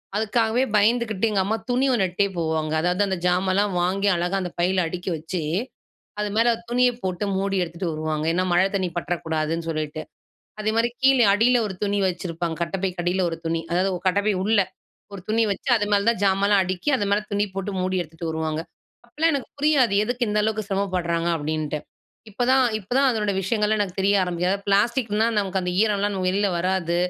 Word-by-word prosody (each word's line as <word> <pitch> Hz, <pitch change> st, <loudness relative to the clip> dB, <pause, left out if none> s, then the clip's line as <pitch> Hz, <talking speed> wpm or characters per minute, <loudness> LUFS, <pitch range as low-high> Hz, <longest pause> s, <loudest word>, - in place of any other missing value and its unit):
அதுக்காவே 220 Hz, +2 st, +1 dB
பயந்துகிட்டு 220 Hz, 0 st, +2 dB
எங்க 200 Hz, -2 st, +2 dB
அம்மா 215 Hz, +3 st, 0 dB
துணி 250 Hz, +2 st, +2 dB
ஒன்ட்டே 195 Hz, -3 st, +1 dB
போவாங்க. 160 Hz, -2 st, -1 dB
அதாவது 180 Hz, +3 st, 0 dB
அந்த 190 Hz, -1 st, -1 dB
ஜாமல்லாம் 185 Hz, +3 st, +2 dB
வாங்கி 195 Hz, +3 st, 0 dB
அழகா 175 Hz, +2 st, -1 dB
அந்த 180 Hz, -1 st, -4 dB
பையில 185 Hz, +1 st, +2 dB
அடுக்கி 180 Hz, +3 st, -5 dB
வச்சு, 165 Hz, +3 st, -4 dB, 0.8 s
அது 210 Hz, 0 st, -1 dB
மேல 230 Hz, +1 st, +4 dB, 0.2 s
துணிய 250 Hz, +1 st, +3 dB
போட்டு 185 Hz, +1 st, -2 dB
மூடி 195 Hz, 0 st, -1 dB
எடுத்துட்டு 170 Hz, +1 st, -4 dB
வருவாங்க. 155 Hz, 0 st, -2 dB
ஏன்னா, 185 Hz, +2 st, +1 dB
மழ 175 Hz, -, +5 dB
தண்ணீ 190 Hz, -2 st, 0 dB
பற்றக்கூடாதுன்னு 165 Hz, -1 st, -2 dB
சொல்லிட்டு. 155 Hz, -1 st, -3 dB, 0.6 s
அதே 215 Hz, 0 st, 0 dB
மாரி 230 Hz, +1 st, +2 dB
கீழ 270 Hz, 0 st, +6 dB, 0.2 s
அடியில 240 Hz, +4 st, +4 dB
ஒரு 195 Hz, -, -6 dB
துணி 205 Hz, 0 st, 0 dB
வச்சிருப்பாங்க, 170 Hz, -2 st, -3 dB
கட்டப்பைக்கு 185 Hz, +1 st, -2 dB
அடியில 180 Hz, +2 st, +1 dB
ஒரு 165 Hz, -, -5 dB
துணி 165 Hz, 0 st, -1 dB
அதாவது 180 Hz, +3 st, +2 dB, 0.2 s
கட்டப்பை 200 Hz, +3 st, +2 dB
உள்ள 215 Hz, +1 st, +3 dB, 0.6 s
ஒரு 195 Hz, -, -7 dB
துணி 225 Hz, +2 st, +2 dB
வச்சு, 195 Hz, -, -7 dB
அது 210 Hz, -, 0 dB
மேல 200 Hz, 0 st, +2 dB
தான் 235 Hz, -, -3 dB
ஜாமான்லாம் 195 Hz, +1 st, +3 dB
அடுக்கி 185 Hz, +5 st, -3 dB
அது 205 Hz, -, -1 dB
மேல 205 Hz, -, +3 dB
துணி 205 Hz, 0 st, +2 dB
போட்டு 195 Hz, +1 st, -3 dB
மூடி 185 Hz, +1 st, -1 dB
எடுத்துட்டு 165 Hz, +1 st, -7 dB
வருவாங்க. 160 Hz, 0 st, -2 dB, 0.5 s
அப்போலாம் 320 Hz, +7 st, +1 dB
எனக்கு 275 Hz, -, -3 dB
புரியாது, 280 Hz, -7 st, +3 dB
எதுக்கு 245 Hz, +1 st, -1 dB
இந்த 210 Hz, 0 st, 0 dB
அளவுக்கு 215 Hz, 0 st, -1 dB
சிரமப்படுறாங்க 180 Hz, -4 st, -1 dB
அப்படின்ட்டு. 155 Hz, 0 st, -2 dB, 0.5 s
இப்பதான் 255 Hz, +5 st, +3 dB
இப்பதான் 250 Hz, +7 st, +1 dB
அதனோட 210 Hz, -4 st, 0 dB
விஷயங்கள்லாம் 210 Hz, +2 st, +1 dB
எனக்கு 195 Hz, -2 st, -3 dB
தெரிய 200 Hz, +1 st, +3 dB
ஆரம்பிக்கது. 180 Hz, +2 st, 0 dB
பிளாஸ்டிக்னா 220 Hz, +1 st, +2 dB
நமக்கு 195 Hz, -2 st, -1 dB
அந்த 180 Hz, -, -2 dB
ஈரம்லாம் 205 Hz, -2 st, 0 dB
வெளியில 200 Hz, +2 st, +1 dB
வராது, 180 Hz, -1 st, 0 dB
195 Hz, 175 wpm, -23 LUFS, 175-215 Hz, 0.8 s, கீழ